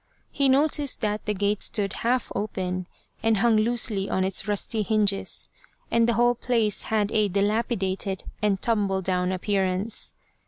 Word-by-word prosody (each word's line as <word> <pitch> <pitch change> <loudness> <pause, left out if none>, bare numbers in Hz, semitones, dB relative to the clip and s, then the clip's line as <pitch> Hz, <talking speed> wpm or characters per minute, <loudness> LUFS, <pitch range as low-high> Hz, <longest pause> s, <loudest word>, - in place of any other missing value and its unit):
He 280 -2 +2
noticed 285 0 +2
that 210 -1 -2
the 210 - +1
gate 205 +1 0
stood 200 -2 +1
half 245 0 0
open, 185 -3 -3 0.3
and 225 -1 +2
hung 230 +2 +3
loosely 215 -3 +1
on 190 - 0
its 190 +2 0
rusty 210 +2 +1
hinges, 205 -1 0 0.4
and 230 0 +3
the - - +3
whole 240 +1 +3
place 230 -4 0
had 215 -2 0
a 215 -1 +2
dilapidated 200 -1 -1 0.2
and 205 -2 +1
tumble 200 -4 0
down 180 0 0
appearance. 190 +2 -2
210 Hz, 150 wpm, -25 LUFS, 195-230 Hz, 0.4 s, hung